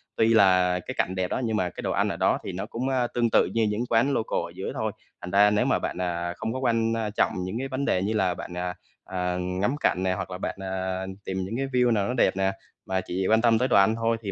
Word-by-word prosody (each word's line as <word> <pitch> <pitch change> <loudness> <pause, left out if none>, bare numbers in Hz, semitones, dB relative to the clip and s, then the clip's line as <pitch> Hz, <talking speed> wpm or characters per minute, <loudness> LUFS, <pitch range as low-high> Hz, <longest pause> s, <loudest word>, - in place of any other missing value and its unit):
tuy 115 0 +3
là 90 -4 +4
cái - - -6
cảnh 95 - 0
đẹp 95 -1 0
đó - - -1
nhưng 110 -2 0
mà 90 -3 0
cái - - -8
đồ - - -2
ăn - - +1
ở - - -3
đó - - +2
thì - - -4
nó - - -4
cũng, 125 +3 -3
ơ, 130 -2 +1
tương 120 -1 +2
tự - - +4
như 115 - +2
những 105 +3 -1
quán 120 +5 +3
local 110 - 0
ở - - -10
dưới - - -4
thôi. - - -2 0.3
Thành 90 - -6
ra 100 +2 +6
nếu 105 0 +2
mà - - +2
bạn, - - -4
à, 85 -1 -2
không 110 0 -3
có 130 - -3
quan, 115 -3 +1
a, 110 -2 -1
trọng 105 - +1
những 95 +5 -4
cái 135 - -3
vấn 135 +1 -3
đề 90 - +1
như 105 +3 -1
là 95 -4 +1
bạn, 85 - -8
à, 90 0 -3 0.3
à, 90 -1 -2
ngắm 90 +9 -1
cảnh 95 -10 +1
nè 95 -1 +1
hoặc 95 0 -5
là 90 - -4
bạn, - - -4
à, 95 0 -3 0.2
tìm 95 0 -3
những 110 +5 -4
cái 135 +1 -1
view 125 -2 +2
nào 100 -3 +1
nó 125 - -1
đẹp 120 -5 +2
nè, 95 0 +2 0.3
mà 95 0 -1
chỉ 95 +1 -2
quan 110 +1 +4
tâm 115 -1 +4
tới 125 +3 +1
đồ - - +2
ăn 100 +3 +5
thôi 115 0 0
thì 100 -3 -4
105 Hz, 295 wpm, -26 LUFS, 95-115 Hz, 0.3 s, ra